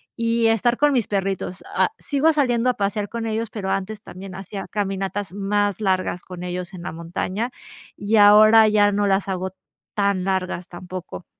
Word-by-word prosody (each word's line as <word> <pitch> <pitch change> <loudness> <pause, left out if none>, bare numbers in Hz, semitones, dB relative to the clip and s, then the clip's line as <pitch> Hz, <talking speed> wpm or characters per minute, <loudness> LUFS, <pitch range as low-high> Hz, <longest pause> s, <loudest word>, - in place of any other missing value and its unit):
y 230 0 +1
estar 225 +2 +2
con 295 -1 +3
mis 240 -5 +1
perritos, 195 -2 -2
ah, - - +3
sigo 290 +3 +2
saliendo 250 -4 +2
a 250 - +1
pasear 205 0 -2
con 230 -1 -4
ellos, 225 0 -2
pero 200 -3 -4
antes 195 +2 -3
también 185 0 -9
hacía 195 +1 -7
caminatas 195 -2 -3
más 205 0 0
largas 185 -3 0
con 180 -1 -9
ellos 180 +1 -5
en 175 - -9
la - - -4
montaña, 180 +7 -3 0.5
y 205 +2 +1
ahora 215 +2 +8
ya 205 -1 +4
no 205 0 +1
las 195 0 +1
hago 190 0 -3 0.4
tan 200 -3 +1
largas 185 -2 -2
tampoco. 180 0 -8
200 Hz, 175 wpm, -22 LUFS, 185-220 Hz, 0.5 s, ahora